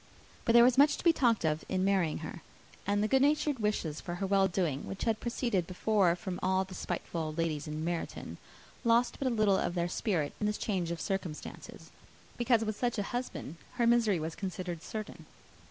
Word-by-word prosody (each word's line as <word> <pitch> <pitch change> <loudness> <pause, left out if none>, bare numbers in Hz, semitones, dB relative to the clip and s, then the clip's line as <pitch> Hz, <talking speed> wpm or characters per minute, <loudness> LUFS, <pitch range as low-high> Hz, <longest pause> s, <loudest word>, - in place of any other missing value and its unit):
But 230 - +3
there 235 0 +9
was 250 +2 +4
much 290 +1 +6
to - - -8
be 335 - +6
talked 235 - +2
of, 155 0 0
in 185 0 +1
marrying 190 -6 +2
her; 165 - -7 0.5
and 205 +1 +2
the - - +2
good 265 +3 +3
natured 290 -1 +2
wishes 210 -8 -1
for 175 - -5
her 195 +2 -2
well 195 0 +3
doing, 170 -7 -1
which 195 - -5
had 225 -2 +1
proceeded 235 -7 -1
before 185 -1 +2
from 180 0 -5
all 190 0 +2
the 190 - -11
spiteful 175 -2 -4
old 155 0 -4
ladies 160 -2 -1
in 155 +1 -4
Meryton, 170 -1 -4 0.5
lost 235 +1 +3
but 265 -2 0
little 215 -4 +3
of 175 - -1
their 170 0 0
spirit 175 -5 -1
in 210 - 0
this 210 - -1
change 185 -5 -1
of 170 -1 -3
circumstances, 190 -6 -5 0.4
because 235 -2 +2
with 215 -1 -2
such 240 -1 0
a 205 - 0
husband 240 - -4 0.2
her 245 -2 +1
misery 230 -6 +3
was 160 +1 -3
considered 180 -3 -5
certain. 215 +3 -7
195 Hz, 200 wpm, -31 LUFS, 170-230 Hz, 0.5 s, there